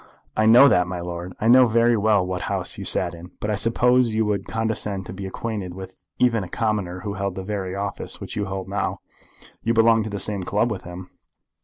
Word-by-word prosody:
"I 110 0 +2
know 120 +5 +8
that, 90 -9 +3
my 90 -1 -4
lord. 85 +1 -6
I 110 - 0
know 125 +1 +7
very 115 +1 +3
well 105 -3 +2
what 90 -1 -3
House - - -2
you - - -5
sat - - +1
in. 85 +1 -10
But 105 - -2
I - - +1
suppose 120 +2 +2
you 110 0 +2
would 100 -2 -2
condescend 105 -3 -2
to - - -8
be 95 0 -6
acquainted 95 -3 -5
with 95 0 -10 0.2
even 115 -4 +2
a 90 - -8
commoner 100 -4 -2
who 100 0 -4
held 100 -1 -3
the 95 - -5
very 95 -2 -4
office 100 0 -5
which - - -7
you 105 - -1
hold 95 -1 -5
now. - - -2 0.6
You 115 +1 0
belonged 115 -1 +4
to - - -4
the 100 -1 -4
same 100 0 +1
club 105 +6 0
with 95 -4 -5
him." 90 +1 -9
100 Hz, 225 wpm, -23 LUFS, 95-110 Hz, 0.6 s, know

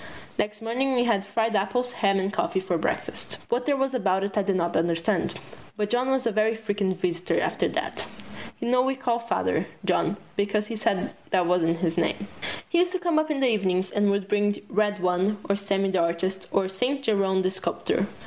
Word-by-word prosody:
Next 210 +1 -1
morning 255 +4 0
we 245 - +3
had 225 -5 +2
fried 225 +2 0
apples, 245 +6 0
ham 200 -5 +2
and 195 +1 -1
coffee 190 - 0
for 185 -2 -1
breakfast. 165 - -3
What 245 +1 0
there 285 -1 +3
was 270 0 0
about 195 -6 +1
it 200 0 -3
I 210 - +3
did 195 -1 0
not 175 -1 0
understand, 165 0 +1 0.4
but 210 -1 -1
John 250 +2 +2
was 265 -1 +1
a 230 - +2
very 215 +1 +2
frequent 205 -4 -1
visitor 175 -1 0
after - - 0
that. - - -3 0.5
You - - -3
know 250 0 +4
we 265 +1 +1
called 240 -3 -1
Father, - - +1 0.2
John, - - +1 0.2
because 205 +1 +1
he 225 - -5
said 200 -3 0 0.2
that 185 -2 +3
wasn't 170 -1 +2
his 165 -2 0
name. 200 +4 -1 0.4
He 345 - +2
used 360 +1 +2
to 370 - 0
come 345 -3 +2
up 310 0 0
in 290 -3 0
the 260 -2 +4
evening 190 -3 +1
and 205 0 +3
would 200 -1 0
bring 205 0 +2
the - - -12
Red 205 -1 +1
One 185 +3 +2
or 200 - +2
Sammy 195 -1 0
the 190 - +2
Artist 180 +3 -1
or 195 -1 +1
Saint 250 +9 -1
Jerome 195 -4 +2
the 185 - +1
Sculptor. 190 0 -1
205 Hz, 215 wpm, -26 LUFS, 190-240 Hz, 0.5 s, know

